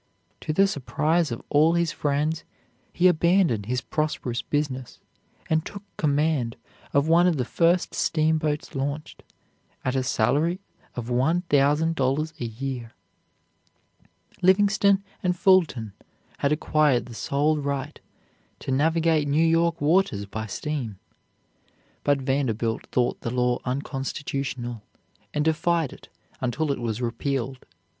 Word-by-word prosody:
To - - -3
the 195 +6 +4
surprise 155 -1 0
of 115 - -5
all 155 +3 +4
his 170 -2 +1
friends, 150 +2 -1 0.5
he 180 - +4
abandoned 170 - +3
his 125 +1 -1
prosperous 130 -6 -2
business 130 -2 -3 0.5
and 160 0 +1
took 200 +2 -8
command 145 -5 +1 0.4
of 140 +2 +2
one 170 +2 +5
of 170 -4 +2
the 125 - 0
first 170 +6 +2
steamboats 155 -2 0
launched, 145 +2 -4 0.6
at 130 +1 0
a 130 - +2
salary 145 +9 +1 0.4
of 120 0 -5
one 155 +8 +2
thousand 150 +1 +3
dollars 150 +2 0
a 120 - -2
year. 120 0 -5 1.5
Livingston 195 +1 +4 0.2
and 180 -1 0
Fulton 165 - +3 0.5
had 140 - +1
acquired 150 -4 +2
the 120 - -10
sole 145 +6 0
right 140 0 -3 0.6
to - - -5
navigate 160 +2 +2
New 150 +3 +3
York 165 0 +2
waters 145 - +2
by 110 +2 -5
steam, 115 0 -4 1.1
but 145 -1 +2
Vanderbilt 130 -5 -1
thought 125 -1 0
the - - -3
law 125 0 +1
unconstitutional, 135 -2 -3 0.5
and 150 0 -1
defied 160 -1 +1
it - - -15 0.3
until 140 +4 0
it 135 - -2
was 120 0 -3
repealed. 130 +2 -3
145 Hz, 125 wpm, -25 LUFS, 125-160 Hz, 1.5 s, one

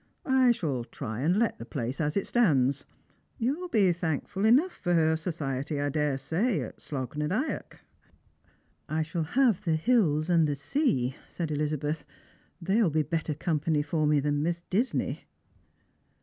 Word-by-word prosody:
I 260 -2 +4
shall 145 - -1
try 115 -2 -6
and 165 +8 +2
let 230 0 +1
the - - -6
place 125 +4 -3
as 150 +2 0
it 200 - 0
stands. 140 - +2 0.5
You'U 285 +9 -1
be 200 -5 +4
thankful 170 +4 -2
enough 275 +12 +5
for 175 - -1
her 160 -1 +3
society, 150 -3 -3
I 145 0 0
daresay, 150 - 0
at 120 - -7
Slogh 130 -2 -5
na 150 0 -1
Dyack." 220 - -3 0.5
" - - -37 0.3
I 155 +1 0
shall 165 +2 -3 0.2
have 240 -8 +4
the 165 -4 +1
hills 160 -5 +2
and 170 -3 +4
the 145 - -1
sea," 135 - 0
said 165 -3 -4
Elizabeth; 150 +1 -1 0.3
" - - -35
they 190 +4 0
■will 210 -8 +3
be 155 +1 +2
better 160 0 -2
company 155 -1 0
for 155 +1 0
me 150 -1 +4
than 145 +1 0
Miss 170 +2 -1
Disney." 230 +8 -1
160 Hz, 165 wpm, -28 LUFS, 145-195 Hz, 0.5 s, enough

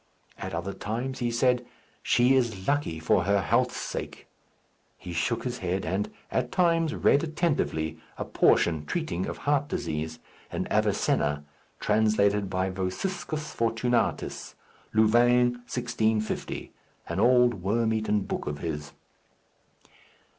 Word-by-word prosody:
At - - -4
other 90 +4 -3
times 125 +5 -4
he 120 -1 0
said, 125 +1 +2 0.4
"She 125 +2 +4
is 115 -8 0
lucky 145 - 0
for 85 +2 +2
her 100 +1 +3
health's 95 - +1
sake." - - -5 0.7
He 90 - -8
shook 85 +8 0
his 125 -1 -3
head, 95 +1 -2
and 95 +5 -1 0.2
at - - -1
times 165 -3 +2
read 140 - +3
attentively 150 - -1 0.2
a - - -3
portion 80 -3 +3
treating 155 - -2
of - - -5
heart 145 0 +2
disease 80 - -3 0.3
in - - -2
Aviccunas, 75 0 +1 0.4
translated 105 -2 +2
by 95 0 -1
Vossiscus 150 - -3
Fortunatus, 115 +1 -1 0.4
Louvain, 120 +3 +4 0.2
1650, 110 -3 -1 0.3
an 85 +3 -3
old 120 -2 +4
worm 110 +4 +1
eaten 110 -1 +1
book - - -4
of 75 - -2
his. 75 -3 -5
110 Hz, 125 wpm, -27 LUFS, 95-125 Hz, 0.7 s, She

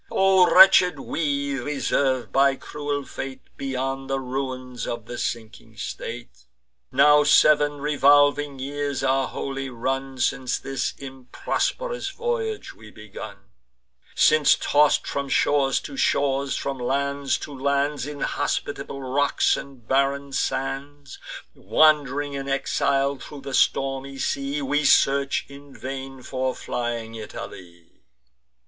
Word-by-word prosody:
O 190 -2 +4
wretched 185 -1 +7
we, 140 -3 -2
reserv'd 135 -1 -1
by 135 0 +4
cruel 145 0 -4
fate, 135 -1 -7
Beyond 135 0 -3
the 135 0 0
ruins 130 -2 -5
of 120 -2 -5
the 120 +1 -7
sinking 115 -1 -5
state! - - -7 0.5
Now 150 +3 +6
sev'n 145 0 +4
revolving 145 0 +3
years 140 +1 -3
are 135 0 +2
wholly 135 0 -5
run, 135 +2 -3
Since 130 0 0
this 135 -1 -3
improsp'rous 140 - -3
voyage 460 -2 -3
we 110 -1 -14
begun; 105 -1 -11 0.6
Since, 155 -1 +5
toss'd 150 0 +2
from 140 -1 -3
shores 135 -1 +2
to - - -8
shores, 140 - +1
from 135 -1 -4
lands 140 +2 -1
to 145 - -8
lands, 140 +1 0
Inhospitable 140 -1 -3
rocks 140 +2 +2
and 130 -5 -10
barren 140 +1 0
sands, 140 +2 -3 0.3
Wand'ring 145 -2 +2
in 140 0 -5
exile 140 0 0
thro' 140 +3 -10
the 135 0 -7
stormy 135 +1 0
sea, 140 +2 -2
We 145 +2 0
search 140 0 +3
in 140 0 -14
vain 135 0 -7
for 130 0 -2
flying 120 -2 -4
Italy. 90 -6 -10
135 Hz, 115 wpm, -24 LUFS, 130-145 Hz, 0.6 s, wretched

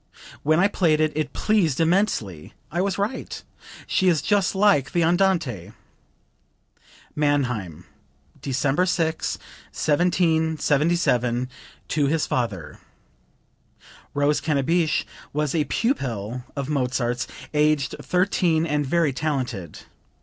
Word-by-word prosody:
When 155 +2 +2
I 195 - +5
played 165 -6 +2
it, 155 -1 +2
it 155 -1 -2
pleased 185 -11 +1
immensely....I 165 - -1
was 195 0 -1
right; 205 +6 -3 0.4
she 190 - +1
is 165 -5 +3
just 205 -2 +1
like 190 -9 +3
the 170 - +2
Andante." 165 - +1 1.4
(Mannheim, 125 - -1 0.6
December 140 +6 +1
6, 165 -3 0 0.3
1777, 160 -6 +1 0.4
to 145 -2 +1
his 155 +2 +1
father. 100 -11 -3 1.4
Rose 145 +1 +2
Cannabich 155 +3 +1 0.3
was 150 -1 -1
a 155 -3 +1
pupil 125 - -2
of 140 -2 -3
Mozart's, 125 -4 -1 0.3
aged 150 -3 +2
thirteen 180 -3 +1
and 150 -2 0
very 150 0 +1
talented. 130 - -3
150 Hz, 100 wpm, -23 LUFS, 130-170 Hz, 1.4 s, I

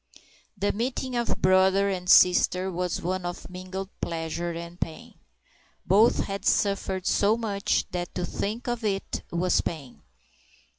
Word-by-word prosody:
The 200 +1 +1
meeting 250 +3 -3
of 235 -1 -1
brother 190 +1 +4
and 180 -2 -3
sister 180 +1 +5
was 180 0 -2
one 185 +1 -2
of 175 0 -5
mingled 185 +1 -6
pleasure 165 +1 -3
and 170 +1 -7
pain. 160 - -6 0.7
Both 210 +6 +4
had 195 0 -5
suffered 195 -2 +1
so 210 +3 +3
much 205 -4 0
that 175 -1 -4
to 180 - -1
think 215 +7 -4
of 240 -1 -2
it 195 -2 -2
was 175 +1 +1
pain. 140 -7 -6
185 Hz, 140 wpm, -26 LUFS, 175-200 Hz, 0.7 s, sister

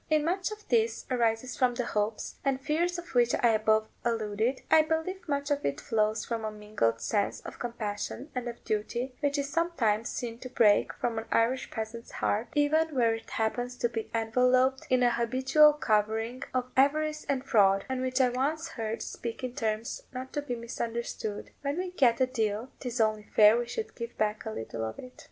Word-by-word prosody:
If 310 -1 +3
much 360 +5 0
of 425 0 -9
this 225 -2 +1
arises 235 0 +1
from 250 -2 +2
the 245 -1 -1
hopes 210 0 -2
and 270 -2 +1
fears 320 +6 0
to 345 - -4
which 240 -1 +4
I 240 - +4
above 220 0 +3 0.2
alluded, 225 +2 0
I 315 - +8
believe 320 +4 -2
much 285 0 -1
of 285 0 +1
it 140 - -1
flows 215 0 0
from 230 -2 -3
a 215 - -1
mingled 210 - -1
sense 200 - 0
of - - -9
compassion 235 +4 -4
and 250 -1 -3
of 235 0 -7
duty, 235 +4 -2
which 285 -1 0
is 280 0 -1
sometimes 235 -11 +1
seen 235 -1 -4
to 255 - -7
break 215 -4 +4
from 230 -2 -2
an 225 - -7
Irish 240 +3 +2
peasant's 225 +1 -6
heart, 215 +4 0
even 305 +1 +2
where 230 -3 +3
it 225 0 -7
happens 245 +3 -1
to 240 - +1
be 225 -2 -4
enveloped 250 +3 +2
in 255 -1 +3
a 240 - +5
habitual 260 +6 +4
covering 225 -1 0
of 255 0 -2
avarice 305 +3 +2
and 270 -1 -1
fraud; 195 -5 +4
and 260 -1 -2
which 255 +1 0
I 255 -1 +5
once 295 +6 -1
heard 225 -1 -4
speak 235 +2 -6
in 250 -1 -3
terms 225 -3 -2
not 260 0 -7
to 290 - -1
be 265 -4 -3
misunderstood: 230 -2 -4
"When 280 +2 -2
we 365 0 -2
get 255 -9 +3
a 260 - +5
deal, 225 -1 -2
'tis 245 -2 -4
only 215 -1 +1
fair 210 0 +8
we 240 0 -1
should 445 - -4
give 235 0 -7
back 215 0 -1
a - - -2
little 115 - -5
of 110 0 -4
it." 250 0 -10
240 Hz, 200 wpm, -29 LUFS, 220-270 Hz, 0.2 s, I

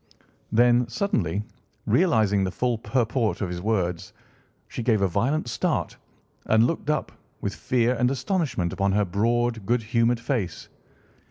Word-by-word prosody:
Then, 120 +1 +4
suddenly 105 - -1 0.4
realising 110 - +3
the 95 - 0
full 120 +5 -1
purport 115 -2 0
of 95 - -2
his 90 0 -5
words, 95 -2 -1 0.5
she - - -6
gave 115 -2 +2
a - - +4
violent 120 - 0
start 115 - -1 0.5
and 110 +1 +4
looked 150 +2 -2
up, 150 -1 0 0.3
with - - -3
fear 125 -1 +1
and 125 0 +1
astonishment 135 - -1
upon 100 0 0
her 105 0 +2
broad, 115 +4 0
good 120 0 +1
humoured 115 +2 +1
face. 120 -7 -3
115 Hz, 145 wpm, -25 LUFS, 100-125 Hz, 0.5 s, Then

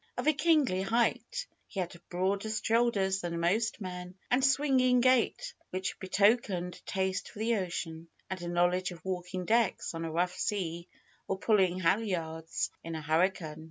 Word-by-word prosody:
Of - - -2
a 310 - +6
kingly 295 - +3
height, 235 - 0 0.2
he 195 - -6
had 175 -1 -3
broader 195 +4 0
shoulders 215 -3 +1
than 170 -1 -3
most 215 +8 +1
men, 180 -2 -6 0.2
and 250 +2 +4
a - - +4
swinging 260 -3 +3
gait 260 - +2 0.2
which 185 0 -3
betokened 190 -2 +2
a - - -13
taste 190 -1 -1
for - - -14
the 225 +1 +1
ocean, 170 -3 -4 0.2
and 185 -1 -5
a 175 - -5
knowledge 175 +1 +2
of 170 -2 -11
walking 180 0 -3
decks 230 -4 +1
on 165 0 -4
a 165 - -3
rough 175 +3 +1
sea 175 -4 -2 0.4
or 195 - -1
pulling 190 -3 +2
halyards 165 -4 0
in 165 0 -5
a 160 - -4
hurricane. 160 0 +1
190 Hz, 165 wpm, -31 LUFS, 175-225 Hz, 0.4 s, a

